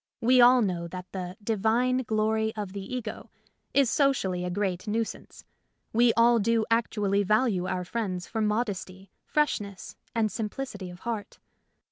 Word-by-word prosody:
We 250 +2 +5
all 245 0 +7
know 175 -4 -2
that 180 +1 -8
the 185 0 -5
divine 225 +4 +2
glory 220 -1 0
of 205 -3 -5
the 200 - -5
ego" 230 -1 -6 0.4
is 275 -1 +4
socially 235 - +1
a 180 - -2
great 190 +1 -2
nuisance; 225 +1 -4 0.5
we 235 +1 +5
all 235 0 +5
do 225 +1 +2
actually 210 -3 +1
value 210 -2 +2
our 180 -1 -2
friends 185 -4 -3
for 225 - -3
modesty, 200 -3 -2 0.2
freshness, 205 -10 -1 0.2
and 220 -2 +1
simplicity 215 -2 -5
of 175 0 -12
heart. 225 -3 -4
215 Hz, 145 wpm, -27 LUFS, 190-235 Hz, 0.5 s, all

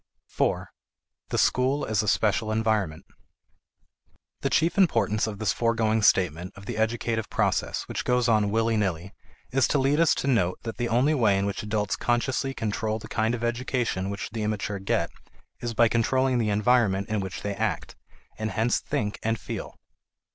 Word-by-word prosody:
4. - - -1 0.6
The - - -1
School 130 +3 +2
as 110 -2 +1
a 105 - -4
Special 110 +2 +1
Environment. 110 -8 0 1.3
The - - -1
chief 165 +2 +2
importance 110 - +2
of 105 -2 -5
this 105 -2 0
foregoing 115 -1 +1
statement 90 -3 +2
of 100 - -12
the 120 - -4
educative 110 0 -1
process - - 0
which - - -3
goes 125 -1 +2
on 105 -3 +3
willy 115 +1 +1
nilly 95 -1 -2 0.4
is 135 0 +3
to - - +1
lead 140 +3 +2
us 165 -2 +4
to - - -3
note 95 -9 +2
that 115 -1 -5
the 120 -1 -1
only 125 +7 +3
way 110 -9 +3
in 100 - 0
which 100 0 -2
adults 105 -1 -1
consciously 130 +3 -1
control 110 0 -2
the 110 - -10
kind 110 +2 0
of 120 - -6
education 120 -5 -1
which 100 +1 -5
the 110 0 -4
immature 105 -1 -2
get 85 -3 -1 0.5
is 120 -1 -4
by 115 +1 +5
controlling 130 +3 +1
the 110 -2 +1
environment 105 -2 +2
in 110 -1 -1
which 95 -1 -5
they 100 - -2
act, - - -2 0.4
and 110 0 -1
hence 115 +2 +1
think 105 -2 -3
and 115 0 -1
feel. - - -6
110 Hz, 175 wpm, -26 LUFS, 105-120 Hz, 1.3 s, by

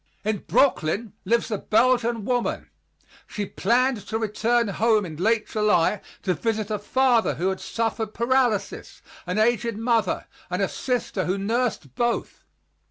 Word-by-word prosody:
In 215 -2 0
Brooklyn 220 - +1
lives 235 +3 +1
a 210 - -1
Belgian 235 -1 +2
woman. 245 0 -1 0.6
She 205 - -4
planned 240 +4 +1
to 220 - -1
return 225 +1 +1
home 215 +1 +2
in 160 -3 -8
late 215 +5 +1
July 210 -3 +2 0.2
to 185 - +1
visit 220 +1 -2
a 210 - -1
father 245 +2 +2
who 185 +3 0
had 190 - -3
suffered 225 -1 -2
paralysis, 235 -3 0 0.2
an 180 +3 -2
aged 230 0 +1
mother 225 -4 0 0.2
and 180 +1 -2
a 195 - +2
sister 240 -6 -2
who 185 +2 0
nursed 215 - -1
both. 240 - -2
220 Hz, 145 wpm, -24 LUFS, 200-235 Hz, 0.6 s, Belgian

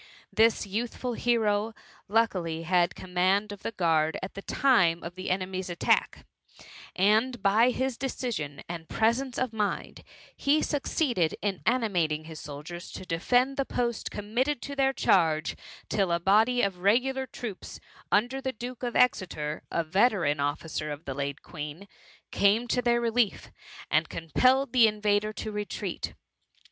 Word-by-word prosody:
This 225 -1 +3
youthful 235 +4 -3
hero 220 -2 +1 0.3
luckily 185 -7 0
had 175 0 +2
command 185 +3 +1
of 205 -1 -9
the - - -3
guard 160 -5 +1
at 190 - -5
the 195 - -7
time 185 -11 +3
of 170 - -6
the 185 +1 -5
enemy's 185 0 -2
attack, 175 - +1 0.7
and 220 +6 +3
by 220 +5 +5
his 260 0 -2
decision 230 - -3
and 165 -1 -7
presence 245 +3 +1
of 255 -3 -1
mind, 210 -2 -3 0.3
he 300 +2 +2
succeeded 250 - 0
in 200 -3 -1
animating 180 -11 +1
his 160 -1 -9
soldiers 150 +5 -8
to - - -7
defend 245 +11 +1
the 275 - +2
post 240 -3 -2
committed 240 +7 -1
to 280 - -6
their 270 -1 +3
charge, 160 -10 +2 0.3
till 195 -4 0
a 170 - +2
body 220 +7 +3
of 190 -3 -1
regular 260 +7 +2
troops 225 -5 -7 0.3
under 245 +6 +2
the 260 -1 -2
Duke 245 +2 -7
of 245 -2 -3
Exeter, 155 -10 +1
a 170 - 0
veteran 175 -4 +2
officer 150 +1 -2
of 145 +2 -7
the 135 - -3
late 140 +1 -4
Queen, 150 +4 -7 0.4
came 210 +4 +3
to 250 - +2
their 235 0 +2
relief, 235 -2 0 0.4
and - - +2
compelled 255 - +2
the 240 -3 +7
invaders 210 0 0
to 215 - -5
retreat. 210 0 -4
THE - - 0
MUMMY. - - -21
205 Hz, 155 wpm, -28 LUFS, 170-245 Hz, 0.7 s, the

